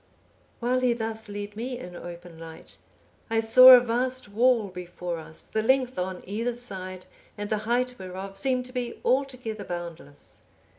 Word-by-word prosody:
While 250 +1 +1
he 250 -1 +3
thus 225 -1 -4
led 205 0 -6
me 245 +3 -4
in 180 -8 -9
open 175 -1 -10
light, 165 -1 -11 0.5
I 225 0 +2
saw 240 +3 +9
a - - +8
vast 250 0 -1
wall 230 0 +3
before 180 -1 -6
us, 160 0 -7
the 220 - -1
length 255 0 +2
on 185 0 -3
either 230 +5 -2
side, 185 -6 -7 0.3
and 205 0 -5
the 215 - +2
height 250 +1 +1
whereof, 190 +1 -7
seemed 255 +3 0
to 255 - -9
be 245 -2 -4
altogether 255 -5 -1
boundless. 170 -5 -8
220 Hz, 160 wpm, -26 LUFS, 185-250 Hz, 0.5 s, saw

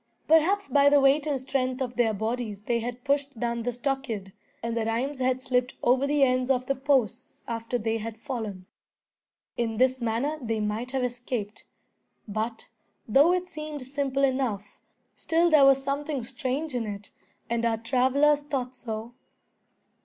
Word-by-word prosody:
Perhaps 360 +6 +4
by 285 -1 +5
the 290 0 +5
weight 280 +2 +4
and 285 -3 0
strength 260 0 -1
of 250 -2 -3
their 240 -2 +3
bodies 220 -1 -3
they 235 +1 0
had 245 +1 -5
pushed 280 -3 0
down 235 0 -1
the 245 +2 -1
stockade, 240 -6 -3 0.3
and 230 0 -2
the 230 - 0
rheims 255 +5 -1
had 255 0 0
slipped 250 -1 0
over 255 +3 +3
the 290 -1 +3
ends 255 -1 +2
of 255 -1 +2
the 275 - +1
posts 260 -3 0
after 230 +1 -2
they 225 0 -1
had 225 0 -6
fallen. 220 -8 -5 0.9
In 225 -2 -1
this 255 +1 +2
manner 240 +7 -1
they 225 -2 -2
might 215 +4 -2
have 265 -1 -1
escaped. 240 -4 -4 0.6
But, 220 +2 -4 0.4
though 280 +9 +5
it 365 0 +1
seemed 305 -5 -7
simple 275 0 -1
enough, 255 -7 -1 0.4
still 335 +1 +2
there 295 -3 +7
was 270 0 +5
something 280 -1 -2
strange 270 +4 -3
in 235 -3 -2
it, 205 0 -7 0.4
and 235 0 -1
our 230 -1 +2
travellers 260 +5 +3
thought 260 -4 -3
so. 225 -1 -6
255 Hz, 165 wpm, -27 LUFS, 230-275 Hz, 0.9 s, there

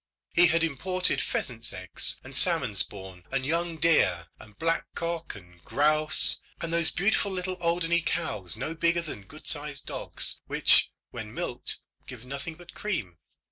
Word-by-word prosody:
He 175 +1 +6
had 165 0 +2
imported 180 +4 +1
pheasants' 115 -2 -2
eggs, 95 -1 0
and - - -11
salmon - - +2
spawn, 95 -3 -3
and 135 -1 -2
young 165 +2 -1
deer, 90 - +2
and 105 -1 -15
black 165 +1 -1
cock 170 -3 -4
and 90 -3 -16
grouse, 155 +1 +4 0.2
and 165 0 -4
those 170 -1 +4
beautiful 200 +1 +1
little 185 0 -2
Alderney 170 0 +2
cows 105 - -2
no 135 +7 -4
bigger 170 +1 +1
than 105 -11 -9
good - - -13
sized - - -1
dogs, - - -2
which, - - +6 0.2
when - - -7
milked, - - -2 0.3
give 125 -2 -10
nothing 140 +5 -6
but 175 +1 -14
cream. 115 - -4
160 Hz, 155 wpm, -27 LUFS, 110-170 Hz, 0.3 s, He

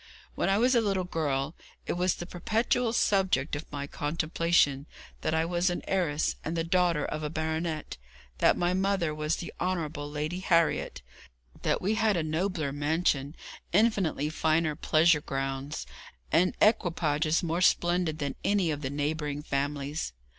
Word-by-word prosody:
When - - 0
I 195 - +3
was 250 +4 +3
a 235 - +4
little 195 -3 0
girl, 150 -4 -1 0.3
it - - -1
was 180 +1 +1
the 175 - -6
perpetual 225 +6 0
subject 190 - +1
of 145 - -7
my 145 -1 -4
contemplation 150 -1 +1 0.3
that 155 - 0
I 160 0 +2
was 175 +1 +1
an 175 - -3
heiress, 165 -6 0
and 165 +2 -3
the 165 - +1
daughter 170 -2 +2
of 155 - -4
a 150 - -2
baronet; 160 0 -3 0.4
that - - +4
my 175 +1 +1
mother 190 -4 +1
was 150 0 -1
the 170 - -7
Honourable 160 -5 -2
Lady 150 +4 -3
Harriet; 170 - +1 0.6
that - - 0
we 205 +4 +2
had 220 -3 +2
a 165 - 0
nobler 160 -1 -1
mansion, 145 0 0 0.4
infinitely 195 -8 +2
finer 160 -1 +1
pleasure 160 0 +3
grounds, 135 +1 -3 0.5
and 180 +3 +3
equipages 165 -7 +2
more 170 +1 -1
splendid 175 -3 +2
than 140 -3 -2
any 195 -5 +2
of 145 -1 -4
the 130 - -3
neighbouring 145 0 -2
families. 145 - -2
160 Hz, 155 wpm, -29 LUFS, 150-180 Hz, 0.6 s, a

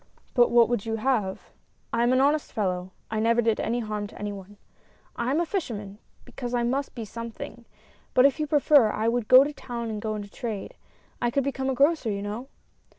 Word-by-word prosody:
" - - -36
But 240 -1 +5
what 235 -1 +5
would 240 -4 -1
you 225 -1 -2
have? 220 -5 -1 0.4
I - - +2
am 240 +1 +3
an 255 - +4
honest 290 +2 +2
fellow, 185 -4 -2 0.2
I 220 - -1
never 230 +2 +3
did 225 -2 +2
any 240 +2 -1
harm 210 -2 -3
to - - -14
any 205 0 -4
one; 200 +1 -11 0.6
I 235 +1 -2
am 290 +4 +2
a 345 - +1
fisherman, 215 - -4 0.3
because 245 -1 -5
I 240 - +1
must 270 +4 -1
be 230 -3 -5
something, 230 +1 -8 0.5
but 255 - +7
if 280 +2 +3
you 305 - -1
prefer, 290 -5 +5
I 215 +1 -1
would 235 -1 0
go 255 +1 +9
to 295 +1 -4
town 235 -4 -5
and 210 -1 -4
go 215 0 -2
into 205 -1 -7
trade. 220 -6 -5 0.5
I 240 - +2
could 275 +3 0
become 270 -1 -2
a 265 - 0
grocer, 285 -2 +3
you 200 -1 -2
know." 215 +6 -5
235 Hz, 220 wpm, -26 LUFS, 215-265 Hz, 0.6 s, go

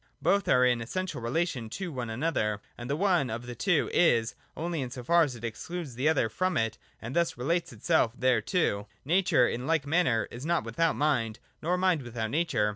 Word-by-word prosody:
Both 200 0 +2
are 125 0 +5
in 120 -2 +2
essential 185 +5 -4
relation 125 -1 -1
to 190 -3 -4
one 125 -5 -4
another; 110 -5 -1 0.2
and 120 +1 -8
the 140 - +1
one 175 -6 +2
of 115 +2 -5
the 120 - -6
two 175 +5 +1
is, 115 -9 +3 0.2
only 165 -1 -2
in 130 - -3
so 125 0 -7
far 170 +7 +4
as 145 -6 +1
it 120 - -12
excludes 145 +6 -5
the 130 +6 +1
other 140 -7 +2
from 185 - -1
it, 115 -1 -1 0.2
and 120 +3 -7
thus 170 -5 +1
relates 165 +8 -1
itself 130 -8 +1
thereto. 115 - +1 0.2
Nature 165 -6 +3
in 125 +3 -3
like 160 -3 +1
manner 145 -8 +2
is 120 +2 -8
not 170 -2 +1
without 155 +9 0
mind, 120 -7 0 0.2
nor 175 +3 +1
mind 180 -4 +2
without 115 -3 -4
nature. 150 -9 +1
135 Hz, 200 wpm, -29 LUFS, 115-170 Hz, 0.2 s, are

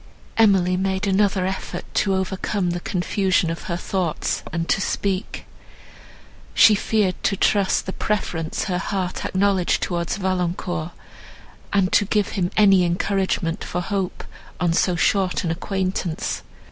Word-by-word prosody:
Emily 190 -5 +4
made 190 +1 -1
another 195 -1 +2
effort 190 +1 -4
to 195 -2 +2
overcome 190 0 -1
the 175 - -2
confusion 185 -1 0
of 165 - -6
her 170 - -2
thoughts, 180 -3 -2
and 165 0 -2
to 195 - +1
speak. 195 +1 -2 1.1
She 215 - +8
feared 205 -2 0
to 195 - +1
trust 200 0 +2
the 190 - -4
preference 165 -6 -2
her 180 -3 -1
heart 190 -2 -3
acknowledged 190 -2 +1
towards 170 -1 -2
Valancourt, 180 -3 -2 0.8
and 195 -2 +2
to 205 - +4
give 210 0 +1
him 180 -4 -1
any 195 -3 +6
encouragement 180 -1 0
for 175 - -3
hope, 190 0 -3 0.4
on 175 -2 +2
so 180 +1 +2
short 185 +2 +1
an 170 - -1
acquaintance. 185 -1 -2
185 Hz, 135 wpm, -22 LUFS, 175-195 Hz, 1.1 s, She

